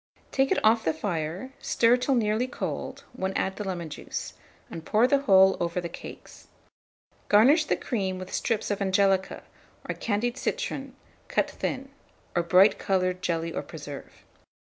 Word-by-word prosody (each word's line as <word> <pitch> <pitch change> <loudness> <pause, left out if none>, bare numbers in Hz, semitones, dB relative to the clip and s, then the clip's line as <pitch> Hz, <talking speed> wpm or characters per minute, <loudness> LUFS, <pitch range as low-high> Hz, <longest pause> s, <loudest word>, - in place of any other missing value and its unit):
Take 270 0 +1
it - - +3
off 225 +1 +4
the 160 - 0
fire, 170 +6 -3
stir 235 +1 +3
till 255 +2 +1
nearly 220 +1 +1
cold, - - -5
when 190 0 -3
add 190 - -1
the 210 - -3
lemon 180 -4 -4
juice, 150 - -6 0.4
and 165 - -7
pour 215 +7 +3
the 280 +2 +3
whole 190 -6 +6
over 170 +1 -1
the 170 -1 -4
cakes. - - -11 0.8
Garnish 270 +10 +6
the - - +1
cream 190 -6 -2
with 185 0 -8
strips 225 -3 -1
of 205 - -2
angelica, 195 -1 +1 0.4
or - - -1
candied 235 +4 -1
citron 275 - -3 0.3
cut - - 0
thin, 270 +1 -4 0.5
or 175 - +3
bright 185 +4 +5
coloured 185 -1 0
jelly 165 -2 -1
or - - -2
preserve. 145 -3 -10
195 Hz, 160 wpm, -27 LUFS, 180-240 Hz, 0.8 s, whole